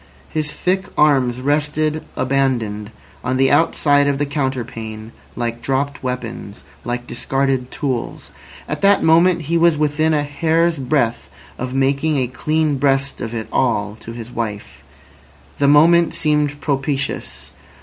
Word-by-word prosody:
His 155 -1 -2
thick 190 +4 -1
arms 130 -5 +3
rested 150 +2 0
abandoned 125 -6 0 0.3
on 130 +1 -1
the 135 0 +3
outside 145 -1 +3
of 140 -1 +1
the 145 - 0
counterpane 115 -6 -4 0.2
like 120 -1 -3
dropped 140 +1 -1
weapons, 120 -5 -5 0.2
like 120 0 -3
discarded 135 +1 -1
tools. 130 -5 -4 0.4
At - - -4
that 200 0 +4
moment 170 +1 +4
he 165 +3 0
was 170 -2 +4
within 155 +1 +1
a 145 - +1
hair's 160 +2 +1
breadth 125 -3 0 0.3
of 130 +1 -4
making 140 +3 +1
a 130 - +1
clean 155 +4 0
breast 135 0 +1
of 115 0 -4
it 110 -1 -4
all 105 -5 0
to 115 - -9
his 115 0 -8
wife. 105 -4 -5 0.8
The 140 - +3
moment 165 +4 +5
seemed 150 -2 +1
propitious. 140 -1 -3
140 Hz, 140 wpm, -19 LUFS, 125-150 Hz, 0.8 s, moment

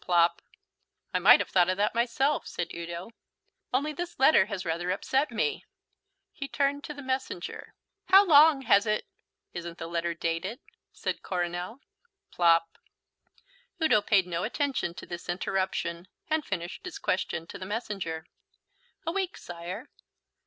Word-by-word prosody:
(Plop.) 170 -1 +3 0.7
"I - - +2
might - - +8
have - - -5
thought 180 -1 +4
of 185 - 0
that 205 +1 +1
myself," 250 +5 +1
said 175 - -4
Udo, 170 +4 -6 0.6
"only 285 +4 0
this 345 +3 -5
letter 265 -8 +6
has 195 -3 -4
rather 170 +2 -2
upset 265 +10 +1
me." 330 - -1 0.7
He 275 - -5
turned 285 0 0
to 300 - -6
the 285 - -8
messenger. 260 -9 -4 0.3
"How 390 +2 +7
long 300 -4 +7
has 205 -3 +4
it 215 0 0 0.3
?" - - -56
"Isn't 170 -1 -6
the - - -5
letter 170 0 -2
dated?" 165 +8 -2 0.3
said - - -3
Coronel. 180 +6 -3 0.5
(Plop.) 165 -1 +3 1.0
Udo 315 -10 +4
paid 200 -3 +3
no 170 -1 -3
attention 250 - -1
to - - -8
this 175 0 -8
interruption 180 -1 -2 0.2
and 315 0 +2
finished 175 -6 -5
his 365 +1 -6
question 185 - -1
to - - -9
the 185 - -6
messenger. 195 -7 -3 0.8
"A 330 - 0
week, 385 0 -2
sire." 175 +6 -7
195 Hz, 150 wpm, -28 LUFS, 175-275 Hz, 1.0 s, might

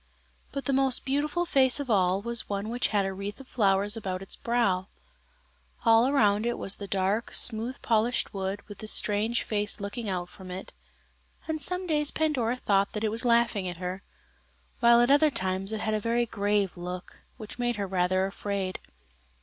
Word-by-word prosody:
But 275 - -5
the 275 - 0
most 265 -1 +2
beautiful 295 +5 0
face 265 -3 +3
of 285 - -4
all 190 -1 +2
was 235 0 -1
one 200 +1 -3
which 240 +2 0
had 205 -2 +1
a 195 - -2
wreath 200 +4 -6
of 270 - -12
flowers 205 -2 +1
about 190 -4 -4
its 195 - -4
brow. 200 -6 0 1.0
All 230 +2 +6
around 215 -7 +3
it 240 - -1
was 195 - +1
the 200 - -7
dark, 195 +4 -1
smooth 235 +3 0
polished 230 +1 +1
wood 195 0 -3
with 205 -2 -10
this 215 - -1
strange 215 +3 +2
face 210 -1 -2
looking 205 +2 -4
out 180 -2 -2
from 185 0 -12
it, 185 +1 -7 0.7
and 315 -1 -2
some 360 +5 -1
days 300 -3 +3
Pandora 255 -7 0
thought 200 -4 +2
it 220 0 0
was 230 +3 -1
laughing 235 -5 +2
at 175 -1 -5
her, 180 +2 -5 0.8
while 235 -1 +6
at 240 +3 +3
other 295 +2 +5
times 190 -5 -1
it 220 -1 -3
had 215 - -1
a 215 - +1
very 235 +2 +1
grave 205 -3 0
look 180 0 -7 0.2
which 220 +1 -10
made 240 0 0
her 205 -1 -2
rather 185 0 +1
afraid. 195 -1 -3
215 Hz, 185 wpm, -28 LUFS, 195-240 Hz, 1.0 s, All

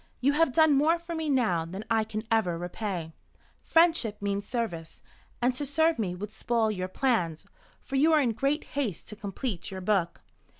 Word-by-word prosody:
You 275 +3 +3
have 325 -1 +3
done 315 +2 +5
more 305 +5 +4
for 340 0 -7
me 320 -2 -2
now 225 - +2
than 190 +6 -7
I 225 -1 +2
can 215 0 -5
ever 185 -7 +2
repay. 175 -2 -4 0.5
Friendship 325 -11 +3
means 200 0 -2
service, 175 -10 -4 0.4
and 250 +1 +3
to 255 - -3
serve 315 +2 +2
me 185 -5 -1
would 210 +3 -7
spoil 230 -2 0
your 185 -3 -3
plans, 185 - 0 0.3
for 270 - -4
you 310 +4 +5
are 310 - +5
in 255 -5 +2
great 275 +7 0
haste 260 - -3
to 210 - -8
complete 205 -1 -4
your 190 -1 -6
book." 185 -3 0
225 Hz, 185 wpm, -28 LUFS, 190-280 Hz, 0.5 s, done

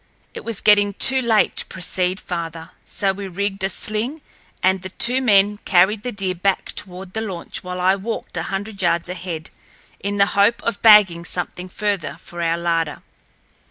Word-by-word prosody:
It - - -8
was 230 -3 -2
getting 205 -1 +4
too 265 +4 +4
late 225 -3 +2
to - - -3
proceed 185 0 -1
farther, 165 -2 -6
so 195 -1 -1
we 195 0 -6
rigged 195 +1 -3
a 190 - +1
sling, 220 +10 -2 0.4
and 190 0 +2
the 185 - -7
two 245 +7 +3
men 205 -3 +3
carried 195 +3 +3
the 245 - -4
deer 195 -3 -1
back 185 +2 -1
toward 185 0 -7
the 220 - -2
launch 190 -6 -4
while 180 0 -5
I 185 +2 +3
walked 215 +4 -5
a - - -1
hundred 200 +1 -4
yards 170 -1 +1
ahead, 175 -3 -6 0.5
in 200 +1 -3
the 200 - +5
hope 205 +4 +3
of 230 - -2
bagging 205 -6 +6
something 180 +1 -4
further 185 -7 -2
for 175 0 -8
our 165 0 +1
larder. 165 -2 -1
195 Hz, 180 wpm, -20 LUFS, 180-210 Hz, 0.5 s, bagging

